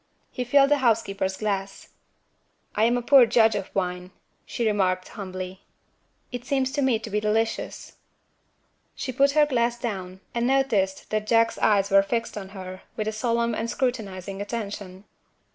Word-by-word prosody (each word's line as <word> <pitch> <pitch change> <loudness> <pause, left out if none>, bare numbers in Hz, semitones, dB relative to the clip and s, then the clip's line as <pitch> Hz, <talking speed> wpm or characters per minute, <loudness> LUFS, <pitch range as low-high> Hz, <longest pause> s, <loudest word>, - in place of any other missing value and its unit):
He 250 - -3
filled 275 +3 +5
the 290 - +4
housekeeper's 200 -6 +1
glass. 200 -2 -3 0.8
"I 215 - +3
am 240 +1 +3
a 245 - -3
poor 265 -1 +7
judge 225 -1 +4
of 200 -2 -3
wine," 180 -1 -2 0.4
she 235 - -2
remarked 185 -4 +1
humbly. 185 -1 -7 0.7
"It 245 -1 -5
seems 265 -1 0
to 290 +1 -1
me 260 -4 +3
to 220 0 -8
be 210 - +1
delicious." 220 +2 -2 1.0
She 260 - -4
put 275 +3 +3
her 300 0 +5
glass 240 -4 0
down, 190 -5 -5
and 235 0 0
noticed 235 -8 +1
that 215 0 -1
Jack's 230 0 +3
eyes 200 -2 +3
were 195 0 +7
fixed 230 +4 -2
on 195 -2 -6
her, 185 -1 -8
with 215 - -3
a - - 0
solemn 235 +1 0
and 225 +1 -2
scrutinizing 200 -7 -3
attention. 205 -3 -5
215 Hz, 160 wpm, -25 LUFS, 195-240 Hz, 1.0 s, poor